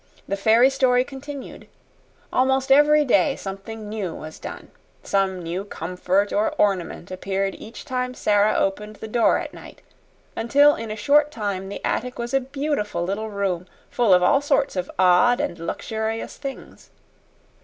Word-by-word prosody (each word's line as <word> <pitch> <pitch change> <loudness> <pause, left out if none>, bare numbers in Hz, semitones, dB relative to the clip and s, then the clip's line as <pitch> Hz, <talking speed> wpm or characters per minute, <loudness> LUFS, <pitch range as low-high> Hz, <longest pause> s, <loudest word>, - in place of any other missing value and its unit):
The 200 - -1
fairy 225 +6 +4
story 255 -2 +3
continued. 275 +1 -9 0.7
Almost 265 +1 +2
every 295 +2 +6
day 275 +2 +3
something 210 +3 -7
new 205 -5 -4
was 155 0 -9
done. - - -9 0.3
Some 190 -2 0
new 175 +4 -3
comfort 185 +2 -1
or 210 - +1
ornament 185 -3 0
appeared 195 +1 -2
each 225 - -10
time 250 -2 -3
Sara 205 -1 +2
opened 210 +2 -1
the 220 - -8
door 230 +1 +3
at - - -6
night, - - -13 0.5
until 285 +6 +4
in 230 -4 -6
a 215 - -4
short 290 +7 +3
time 200 -8 -4
the 200 - -6
attic 250 +1 -2
was 235 +1 -5
a 270 - +4
beautiful 270 - -2
little 200 +5 -3
room 190 -3 -2 0.2
full 235 -5 +2
of 180 -1 +6
all 275 +10 +4
sorts 285 -3 +1
of 180 -1 -3
odd 185 +7 +4
and 170 - -3
luxurious 220 +6 -4
things. 275 -2 -9
220 Hz, 155 wpm, -23 LUFS, 195-260 Hz, 0.7 s, every